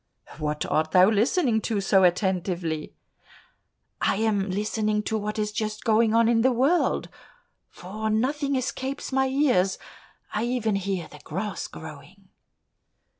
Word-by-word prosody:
"What 150 -1 -2
art 155 0 0
thou 185 +3 +6
listening 230 - +2
to 215 -2 -1
so 195 0 +3
attentively?" 175 -3 0 1.1
"I - - +2
am 205 -2 0
listening 210 +2 -1
to 220 - -2
what 210 0 -3
is 210 -1 -1
just 215 0 -3
going 225 0 +3
on 230 0 +4
in 230 -1 +3
the 260 +2 +4
world, 270 +9 +1 0.6
for 215 +4 -5
nothing 275 +6 0
escapes 265 +2 -3
my 265 0 +2
ears; 255 -9 +2 0.6
I 215 +2 0
even 240 -4 0
hear 195 -3 -3
the - - -14
grass 195 +7 -4
growing." - - -12
215 Hz, 135 wpm, -25 LUFS, 190-240 Hz, 1.1 s, thou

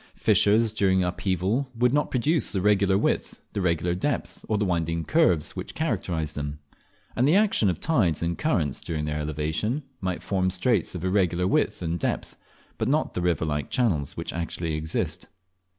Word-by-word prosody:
Fissures 110 +2 +4
during 95 -3 +2
upheaval 95 +8 -1
would 125 +1 +3
not 145 0 +1
produce 145 +6 +1
the 100 - 0
regular 100 -1 +3
width, - - -1
the 100 - -1
regular 85 -1 +1
depth, 140 +11 -3
or 110 - +2
the 105 - +1
winding 85 -2 -1
curves 90 - +2
which - - -6
characterise 90 - -2
them; 75 0 -4 0.6
and 125 +3 +3
the 155 - +4
action 200 - +3
of 90 - -2
tides 95 - +1
and 85 0 0
currents 80 - 0
during 75 -2 -3
their 75 0 -2
elevation 80 - -2 0.2
might 95 -2 -3
form 95 -2 0
straits 95 0 +1
of 90 0 -4
irregular 90 -2 +1
width 95 - +1
and 85 +1 -2
depth, - - -2 0.4
but - - 0
not 150 +4 +1
the 90 - -2
river 85 -3 +1
like 75 -4 -2
channels 90 - 0
which - - -4
actually 85 -1 -3
exist. 80 +2 -2
90 Hz, 175 wpm, -26 LUFS, 80-110 Hz, 0.6 s, Fissures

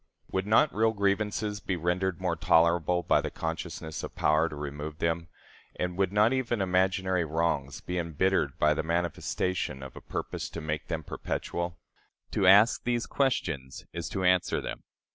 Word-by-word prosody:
Would 95 +1 -1
not 115 +8 +4
real 110 +1 +2
grievances 105 +1 0
be 95 -2 -2
rendered 90 +2 -1
more 90 -2 0
tolerable 85 +1 +3
by - - +3
the - - -3
consciousness 80 -1 -5
of - - -7
power 80 +2 +3
to 75 - -7
remove 75 +1 -5
them; 85 0 -1 0.5
and 90 0 -2
would 95 0 +1
not 105 +4 +4
even 120 -3 0
imaginary 95 -1 +1
wrongs 80 -3 -1
be 90 0 -3
embittered 85 -2 0
by 75 0 +4
the - - -1
manifestation 85 -2 -1
of 65 - -9
a - - -9
purpose - - -4
to - - -6
make 80 -1 -3
them 80 -2 -3
perpetual? 85 +4 -4 0.5
To 95 - +2
ask 100 +5 +6
these 120 -1 0
questions 80 - -1
is 85 -1 -4
to 95 - -3
answer 90 -1 +3
them. - - -5
90 Hz, 165 wpm, -29 LUFS, 80-95 Hz, 0.5 s, ask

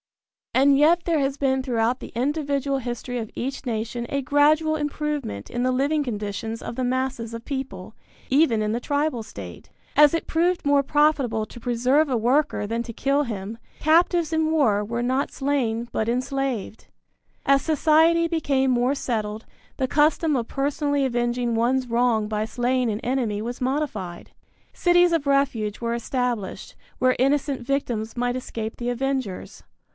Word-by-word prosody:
And 275 +1 +5
yet 335 +4 +4
there 330 -3 +2
has 275 0 -1
been 265 -2 +1
throughout 240 -1 0
the - - -8
individual 280 +1 0
history 245 0 -4
of 220 -2 -5
each 270 +3 -4
nation 235 0 -3
a 280 0 -1
gradual 305 +3 +3
improvement 295 - -3
in 240 0 -2
the 255 - +2
living 285 +4 +1
conditions 220 -1 -4
of - - -6
the 260 - -2
masses 250 -2 -2
of 230 0 -7
people, 250 -8 -5 0.3
even 265 -5 +3
in 210 0 0
the 235 - -1
tribal 285 -2 -1
state. 220 - -10 0.3
As 295 0 +7
it 330 - -1
proved 345 +1 +1
more 285 -1 +4
profitable 275 -7 +2
to 240 - -12
preserve 250 +6 +2
a 250 - +1
worker 245 -1 +1
than 230 +2 -2
to 235 - -8
kill 275 +5 +1
him, 220 -2 -5 0.2
captives 330 +1 +3
in 315 0 +1
war 225 -10 +2
were 235 +3 -3
not 260 +3 0
slain, 245 -5 -1
but 220 - -1
enslaved. 255 -3 -2 0.6
As 275 0 +4
society 320 +2 +3
became 275 -5 +1
more 250 +3 +2
settled, 220 -4 -3 0.3
the 260 - 0
custom 300 +2 +2
of 235 -3 -1
personally 285 0 0
avenging 240 -1 0
one's 250 +3 +1
wrong 230 -2 +1
by 210 0 -1
slaying 245 +2 0
an 210 -1 -2
enemy 235 -5 -1
was 240 +4 -5
modified. 250 -10 -3 0.4
Cities 350 -1 +4
of 305 -4 0
refuge 265 -7 +1
were 235 0 -2
established, 235 -3 -3 0.2
where 255 0 +3
innocent 275 0 +1
victims 240 -4 -2
might 245 0 0
escape 225 -3 -5
the 240 0 -3
avengers. 255 -5 -3
255 Hz, 160 wpm, -24 LUFS, 230-285 Hz, 0.6 s, As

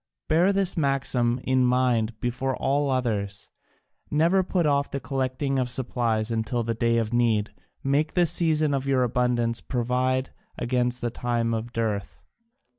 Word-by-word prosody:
Bear 175 +5 +4
this 195 -2 +1
maxim 135 -5 +1
in 130 -1 +2
mind 125 -3 +1
before 125 +1 -2
all 140 +1 0
others 105 -6 -2 0.6
never 170 +6 +3
put 180 -2 0
off 140 -1 +1
the 140 - -3
collecting 135 +1 -2
of 125 -1 -1
supplies 120 -3 0
until 115 +1 -1
the 115 0 -1
day 115 +1 +1
of 115 0 -1
need, 115 -3 +1 0.3
make 145 +3 0
the 175 -1 +4
season 155 -2 +2
of 135 0 -2
your 130 -2 +2
abundance 120 -1 0
provide 130 +1 -1 0.3
against 125 0 -1
the 120 -1 -1
time 120 -1 -1
of 115 +1 -4
dearth. 110 -4 -3
125 Hz, 150 wpm, -25 LUFS, 115-140 Hz, 0.6 s, Bear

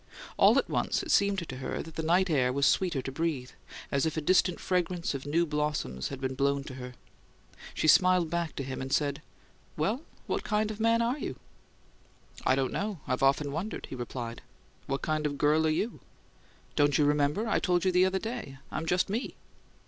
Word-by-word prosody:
All - - +6
at - - +2
once - - 0
it - - -3
seemed 195 -4 +2
to 130 - -6
her 130 - -4
that 160 - -11
the 160 - -2
night 175 +4 +3
air 130 -7 +2
was 140 +2 +1
sweeter 170 -7 +2
to 135 - -4
breathe, 135 -4 -2 0.4
as 140 - +1
if 160 - -3
a - - 0
distant 180 +2 +3
fragrance 180 -2 -1
of 140 0 -5
new 165 +4 +2
blossoms 150 - -2
had 135 - -6
been 130 -1 -2
blown 140 +1 +1
to 135 - -8
her. 125 -1 -8 0.8
She - - 0
smiled 180 -1 +5
back 170 -2 -2
to 140 - -3
him, 130 0 -5
and 135 0 -5
said, 145 0 +1 0.6
"Well, 205 - 0 0.2
what - - -2
kind 215 0 0
of 215 - -8
man 230 +1 +3
are 245 +5 0
you?" - - -4 1.1
"I 130 - +4
don't 135 -1 -1
know; 205 -3 -2
I've 130 - -1
often 140 +1 +3
wondered," 175 +9 -4
he - - -4
replied. 120 -1 -5 0.5
"What 135 0 -2
kind 155 -1 0
of 145 -1 -4
girl 155 +2 +3
are - - +3
you?" 200 +9 -1 0.8
"Don't 145 -2 +3
you 150 - +4
remember? 150 +9 +1
I 220 - +2
told 175 -1 +1
you 185 - +4
the 180 +1 +4
other 190 0 0
day. 220 - -5
I'm 165 - -3
just 180 +2 +2
me!" 225 +6 -3
155 Hz, 205 wpm, -29 LUFS, 135-185 Hz, 1.1 s, All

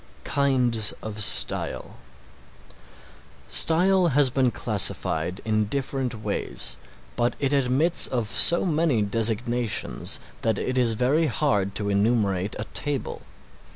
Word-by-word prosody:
KINDS 125 -6 +2
OF 110 -1 -7
STYLE 100 - +1 1.5
Style 180 +2 +4
has 145 -3 +2
been 130 -1 +1
classified 100 -4 -1
in 110 -1 0
different 135 +1 -3
ways, - - -2 0.4
but 120 0 -1
it 140 0 -1
admits 140 +5 +3
of 120 -3 -3
so 170 - +3
many 155 - 0
designations 115 +2 -1 0.2
that 110 -2 -1
it 130 - -3
is 120 -3 +1
very 140 +8 +1
hard 100 -11 -1
to 105 -1 -2
enumerate 100 -2 0
a 110 - -4
table. 145 -3 -4
125 Hz, 115 wpm, -23 LUFS, 110-140 Hz, 1.5 s, Style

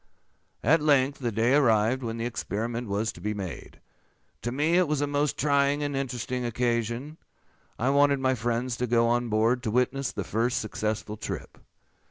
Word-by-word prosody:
"At 150 +7 +4
length 140 -2 +3
the 120 -3 -1
day 115 +4 +2
arrived 120 -2 +3
when 115 -2 -4
the 115 - -3
experiment 115 0 -3
was 105 +3 -1
to - - -14
be 105 +1 -2
made. 95 -4 -7 0.6
To 120 - -3
me 150 +6 +1
it 180 - +3
was 150 -1 0
a 145 - +1
most 145 0 0
trying 140 0 +2
and 145 -1 -2
interesting 125 -2 -3
occasion. 120 +4 -1 0.6
I 130 +4 +1
wanted 140 0 +4
many 130 0 +2
friends 120 +1 -1
to 125 - -1
go 115 0 +3
on 120 0 +1
board 115 +3 +2
to 120 - -2
witness 125 +4 0
the - - -4
first 120 +2 0
successful 110 0 -3
trip. - - -6
125 Hz, 180 wpm, -27 LUFS, 115-140 Hz, 0.6 s, At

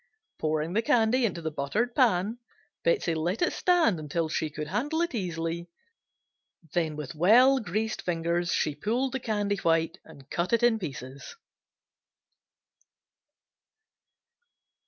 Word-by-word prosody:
Pouring 155 +2 -1
the 220 - +2
candy 230 +1 +3
into 170 -5 -6
the 160 - -2
buttered 200 - -1
pan, 225 -3 +2 0.4
Betsey 475 - +2
let 175 - -1
it - - +1
stand 335 - +3
until 155 +2 -2
she 155 0 -2
could 150 0 -6
handle 285 - -1
it 345 - -3
easily, 170 -4 -3 1.0
then 160 -3 0
with 150 -1 -6
well 240 - +5
greased 220 +1 -2
fingers 170 0 -1
she 150 - +1
pulled 235 - -1
the 265 - -2
candy 205 -4 -1
white 165 -2 +1
and 135 -1 -15
cut 175 +5 -1
it 235 - +3
in 235 -2 +4
pieces. 135 - -7
180 Hz, 130 wpm, -28 LUFS, 160-235 Hz, 1.0 s, well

